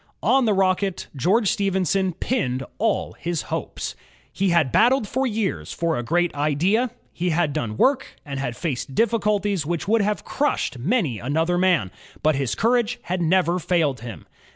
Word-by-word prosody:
On 265 Hz, -2 st, +4 dB
the 215 Hz, -, +3 dB
Rocket, 190 Hz, 0 st, 0 dB
George 190 Hz, -, +2 dB
Stephenson 190 Hz, -1 st, 0 dB
pinned 135 Hz, -, -1 dB, 0.2 s
all 220 Hz, -1 st, 0 dB
his 170 Hz, -2 st, -2 dB
hopes. -, -, -4 dB, 0.4 s
He 195 Hz, 0 st, +1 dB
had 170 Hz, -7 st, +3 dB
battled 240 Hz, 0 st, +4 dB
for 260 Hz, +4 st, 0 dB
years 215 Hz, -4 st, -2 dB
for 170 Hz, -1 st, -1 dB
a -, -, -1 dB
great 175 Hz, +7 st, +1 dB
idea. 165 Hz, -, +1 dB, 0.2 s
He 180 Hz, +1 st, -1 dB
had 160 Hz, -3 st, +1 dB
done 110 Hz, -4 st, -3 dB
work 265 Hz, 0 st, +3 dB, 0.2 s
and 140 Hz, -2 st, -5 dB
had 125 Hz, -3 st, -3 dB
faced 135 Hz, -4 st, -3 dB
difficulties 210 Hz, -5 st, +1 dB
which 170 Hz, +4 st, -3 dB
would 225 Hz, +1 st, +3 dB
have 210 Hz, +1 st, -1 dB
crushed 280 Hz, -, -1 dB
many 155 Hz, -, 0 dB
an 140 Hz, +7 st, -2 dB
other 165 Hz, +2 st, +2 dB
man, 180 Hz, -, +2 dB, 0.3 s
but 155 Hz, +1 st, +4 dB
his 135 Hz, -3 st, -1 dB
courage 240 Hz, +1 st, +1 dB
had 180 Hz, +1 st, -2 dB
never 175 Hz, +1 st, +2 dB
failed 160 Hz, -6 st, +1 dB
him. 110 Hz, -8 st, -9 dB
180 Hz, 170 wpm, -23 LUFS, 150-210 Hz, 0.4 s, On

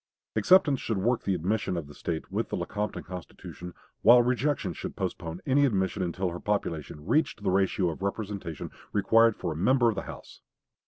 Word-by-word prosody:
Acceptance 165 Hz, -8 st, +5 dB
should 110 Hz, -, -2 dB
work 115 Hz, +5 st, +1 dB
the 95 Hz, -, +1 dB
admission 95 Hz, +2 st, -1 dB
of 85 Hz, -, -3 dB
the 75 Hz, -, -12 dB
State 80 Hz, +2 st, -4 dB
with -, -, -2 dB
the -, -, -2 dB
Lecompton 105 Hz, +1 st, -3 dB
Constitution, 90 Hz, 0 st, -9 dB, 0.3 s
while 120 Hz, +2 st, +8 dB
rejection 125 Hz, -, 0 dB
should -, -, -6 dB
postpone 85 Hz, +1 st, -4 dB
any 140 Hz, +2 st, +3 dB
admission 95 Hz, -7 st, +1 dB
until 90 Hz, +1 st, -1 dB
her 85 Hz, +1 st, -6 dB
population 80 Hz, -7 st, -3 dB
reached 115 Hz, -, +1 dB
the 95 Hz, -, +1 dB
ratio 95 Hz, -1 st, +2 dB
of 80 Hz, -, -9 dB
representation 100 Hz, -5 st, -4 dB, 0.2 s
required 115 Hz, +2 st, +4 dB
for -, -, -3 dB
a -, -, -10 dB
member 120 Hz, -, +3 dB
of 110 Hz, -, -1 dB
the 95 Hz, -, -2 dB
House. -, -, -11 dB
100 Hz, 180 wpm, -28 LUFS, 90-115 Hz, 0.3 s, while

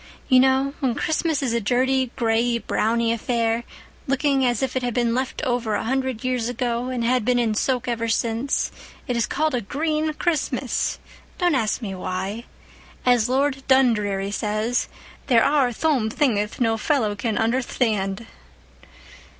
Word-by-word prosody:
You 255 Hz, -2 st, +6 dB
know, 265 Hz, +1 st, +3 dB
when 260 Hz, -6 st, 0 dB
Christmas 315 Hz, 0 st, 0 dB
is 245 Hz, -4 st, 0 dB
a 235 Hz, -, 0 dB
dirty 260 Hz, +3 st, +1 dB
grayey 235 Hz, 0 st, +1 dB
browney 230 Hz, +1 st, 0 dB
affair, 230 Hz, 0 st, 0 dB, 0.4 s
looking 275 Hz, 0 st, +2 dB
as 245 Hz, 0 st, +1 dB
if 265 Hz, -, -2 dB
it 260 Hz, -, 0 dB
had 245 Hz, -2 st, -2 dB
been 240 Hz, -2 st, +1 dB
left 260 Hz, +1 st, -2 dB
over 240 Hz, -4 st, 0 dB
a -, -, -1 dB
hundred 260 Hz, -1 st, -1 dB
years 250 Hz, -2 st, -1 dB
ago 245 Hz, 0 st, -2 dB
and 250 Hz, -2 st, -2 dB
had 245 Hz, 0 st, +2 dB
been 250 Hz, +2 st, +2 dB
in 230 Hz, -3 st, +1 dB
soak 250 Hz, +3 st, 0 dB
ever 230 Hz, -1 st, -1 dB
since, 230 Hz, +4 st, 0 dB, 0.4 s
it 245 Hz, -, -1 dB
is 235 Hz, -, +1 dB
called 310 Hz, +1 st, 0 dB
a 245 Hz, -, 0 dB
green 310 Hz, +8 st, -1 dB
Christmas! 280 Hz, -7 st, -1 dB, 0.4 s
Don't 355 Hz, -3 st, +2 dB
ask 230 Hz, -2 st, 0 dB
me 195 Hz, -3 st, -4 dB
why. 190 Hz, +5 st, -4 dB, 0.6 s
As 245 Hz, -2 st, +3 dB
Lord 270 Hz, +1 st, +1 dB
Dundreary 210 Hz, -7 st, +2 dB
says, 215 Hz, +4 st, -1 dB, 0.4 s
'there 235 Hz, -4 st, +5 dB
are 280 Hz, -4 st, +3 dB
thome 255 Hz, -3 st, +1 dB
thingth 220 Hz, -5 st, 0 dB
no 225 Hz, -2 st, +2 dB
fellow 225 Hz, -4 st, +1 dB
can 210 Hz, +1 st, -2 dB
underthtand. 225 Hz, -3 st, 0 dB
245 Hz, 160 wpm, -23 LUFS, 225-265 Hz, 0.6 s, You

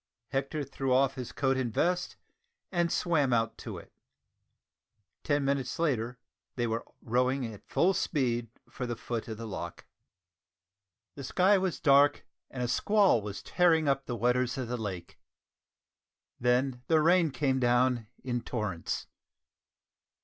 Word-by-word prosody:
Hector 140 Hz, +2 st, -2 dB
threw 135 Hz, -1 st, -3 dB
off 135 Hz, +1 st, +4 dB
his 125 Hz, -3 st, -6 dB
coat 135 Hz, -1 st, +1 dB
and 125 Hz, -3 st, -1 dB
vest, 180 Hz, +9 st, 0 dB, 0.6 s
and 175 Hz, -2 st, +1 dB
swam 150 Hz, -7 st, +1 dB
out 115 Hz, -1 st, +1 dB
to -, -, -6 dB
it! -, -, -13 dB, 1.3 s
Ten 145 Hz, -2 st, +1 dB
minutes 135 Hz, -2 st, -1 dB
later, 125 Hz, -7 st, 0 dB, 0.4 s
they 120 Hz, -, 0 dB
were 115 Hz, 0 st, -2 dB, 0.2 s
rowing 125 Hz, +3 st, +1 dB
at 100 Hz, -, -15 dB
full 190 Hz, +3 st, +3 dB
speed 120 Hz, -, 0 dB, 0.2 s
for 125 Hz, -, -5 dB
the 120 Hz, -, -2 dB
foot 115 Hz, 0 st, -4 dB
of 110 Hz, -1 st, -5 dB
the 115 Hz, -, -6 dB
loch. 85 Hz, -5 st, -6 dB, 1.3 s
The 140 Hz, -, -8 dB
sky 190 Hz, +8 st, +3 dB
was 185 Hz, -2 st, -1 dB
dark 145 Hz, -2 st, +4 dB, 0.2 s
and 125 Hz, -2 st, -4 dB
a -, -, 0 dB
squall 200 Hz, -, +3 dB
was 100 Hz, -1 st, -6 dB
tearing 165 Hz, -4 st, +3 dB
up 135 Hz, 0 st, +1 dB
the 120 Hz, -, -2 dB
waters 125 Hz, +2 st, +1 dB
of 130 Hz, -3 st, -3 dB
the 125 Hz, -, -1 dB
lake. 95 Hz, -7 st, -6 dB, 1.2 s
Then 125 Hz, +1 st, +1 dB
the 160 Hz, -1 st, +4 dB
rain 170 Hz, +1 st, +4 dB
came 130 Hz, 0 st, 0 dB
down 120 Hz, -1 st, +2 dB, 0.2 s
in 120 Hz, -2 st, -2 dB
torrents. 105 Hz, -10 st, -3 dB
130 Hz, 145 wpm, -30 LUFS, 120-145 Hz, 1.3 s, off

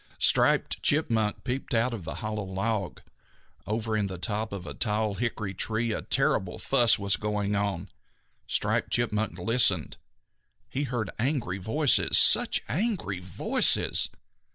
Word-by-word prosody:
Striped -, -, +2 dB
Chipmunk 115 Hz, -8 st, +1 dB
peeped 130 Hz, -1 st, -3 dB
out 115 Hz, +2 st, +1 dB
of 100 Hz, -8 st, -7 dB
the 80 Hz, -, -5 dB
hollow 105 Hz, -1 st, -3 dB
log. 95 Hz, +1 st, -3 dB, 0.7 s
Over 110 Hz, +1 st, -2 dB
in 105 Hz, -2 st, 0 dB
the 95 Hz, -1 st, -6 dB
top 105 Hz, +3 st, -3 dB
of 100 Hz, -3 st, -6 dB
a -, -, -7 dB
tall 105 Hz, -1 st, 0 dB
hickory 105 Hz, -3 st, -3 dB
tree 110 Hz, +4 st, -2 dB
a -, -, -3 dB
terrible 90 Hz, -2 st, 0 dB
fuss 120 Hz, -4 st, +3 dB
was 100 Hz, -1 st, +1 dB
going 105 Hz, -1 st, -2 dB
on. 100 Hz, -2 st, -2 dB, 0.6 s
Striped -, -, 0 dB
Chipmunk 110 Hz, -2 st, -1 dB
listened. 110 Hz, -, +1 dB, 0.7 s
He 145 Hz, +2 st, -3 dB
heard 120 Hz, -5 st, -3 dB
angry 115 Hz, -, -1 dB
voices, 130 Hz, +9 st, +3 dB
such -, -, +5 dB
angry 160 Hz, -, -2 dB
voices! 90 Hz, -1 st, +2 dB
110 Hz, 135 wpm, -27 LUFS, 100-120 Hz, 0.7 s, such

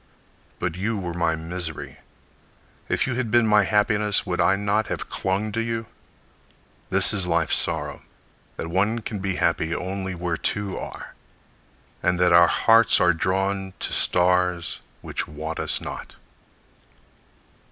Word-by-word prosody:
But 85 Hz, -2 st, -2 dB
you 105 Hz, +4 st, -1 dB
were 90 Hz, -3 st, -4 dB
my 85 Hz, -1 st, +1 dB
misery. 80 Hz, 0 st, -5 dB, 0.9 s
If -, -, +1 dB
you 130 Hz, -, -2 dB
had 120 Hz, -2 st, -2 dB
been 120 Hz, +1 st, +4 dB
My 105 Hz, -2 st, +4 dB
happiness 105 Hz, 0 st, +2 dB
would 90 Hz, -2 st, -1 dB
I 95 Hz, -, +4 dB
not 100 Hz, +2 st, 0 dB
have -, -, -4 dB
clung 100 Hz, +3 st, -1 dB
to 115 Hz, +2 st, -1 dB
you? 115 Hz, 0 st, -2 dB, 1.0 s
This 95 Hz, +1 st, +2 dB
is 95 Hz, -4 st, -1 dB
life's 85 Hz, -2 st, +2 dB
sorrow: -, -, -2 dB, 0.6 s
That -, -, -4 dB
one 105 Hz, +6 st, +1 dB
can 105 Hz, -1 st, -5 dB
be 95 Hz, -1 st, -2 dB
happy 85 Hz, -1 st, 0 dB
only 95 Hz, 0 st, -4 dB
where 85 Hz, -1 st, -2 dB
two 100 Hz, +2 st, -2 dB
are; -, -, -7 dB, 0.9 s
And 90 Hz, -, +1 dB
that 90 Hz, -1 st, +4 dB
our 85 Hz, 0 st, +8 dB
hearts 115 Hz, +5 st, +5 dB
are 90 Hz, 0 st, +4 dB
drawn 95 Hz, +2 st, -1 dB
to -, -, -3 dB
stars 90 Hz, -1 st, +1 dB, 0.2 s
Which -, -, -4 dB
want 80 Hz, +2 st, -5 dB
us -, -, -1 dB
not. -, -, -8 dB
95 Hz, 145 wpm, -24 LUFS, 85-105 Hz, 1.0 s, our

